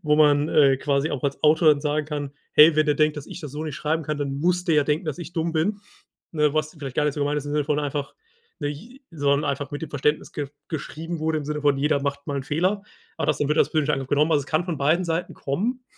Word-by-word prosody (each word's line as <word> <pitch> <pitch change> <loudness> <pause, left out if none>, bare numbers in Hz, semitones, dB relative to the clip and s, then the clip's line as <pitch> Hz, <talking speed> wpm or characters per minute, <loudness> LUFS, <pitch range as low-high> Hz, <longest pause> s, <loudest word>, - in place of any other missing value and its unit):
Wo 150 -2 +3
man, 150 0 +4
äh, 140 -3 +5
quasi 140 +2 0
auch 130 - -3
als 140 -1 -2
Autor 155 +1 +5
dann 145 -1 +2
sagen 150 0 0
kann: 145 -2 -4 0.2
„Hey, 155 +1 +7
wenn 155 0 +3
er 150 - +4
denkt, 155 0 +2
dass 145 - -7
ich - - -8
das 150 - -7
so 150 +2 -4
nicht 155 -3 -5
schreiben 160 +2 -1
kann, 150 -1 -3
dann 140 -1 -3
muss 180 +1 +1
der 165 -4 +2
ja 145 - +4
denken, 150 +3 0
dass 150 - -2
ich 175 0 -8
dumm 165 0 -1
bin.“ 185 +6 0 0.5
Ne, 150 -2 +2
was 155 +2 -1
vielleicht 135 -3 -6
gar 150 - +2
nicht 150 - +1
so - - -4
gemeint 145 +1 0
ist, 145 - -4
im 145 - -4
Sinne 150 -1 0
von 150 -1 0
einfach 145 -1 -3 0.5
nich 175 - -6
sondern 145 -1 +1
einfach 140 +1 -3
mit 145 - -5
dem 160 - -5
Verständnis 150 +1 -1
ge 145 -2 -4 0.2
geschrieben 160 +2 -5
wurde, 155 0 0
im 145 - -6
Sinne 150 0 -3
von 145 -2 +3
„Jeder 140 0 +1
macht 140 0 -3
mal 140 -1 -2
'n 135 - -4
Fehler.“ 185 +8 0 0.3
Aber 160 - -1
das 150 -1 +1
wird 150 +2 +1
als 145 - +4
persönlicher 150 -2 +1
Angriff 135 -1 -3
genommen. 150 +3 +2
Also, 145 -2 +3
es - - -18
kann 155 +2 +1
von 170 -4 -3
beiden 155 +6 +2
Seiten 165 +1 -2
kommen. 230 - -2
150 Hz, 275 wpm, -24 LUFS, 145-160 Hz, 0.5 s, Hey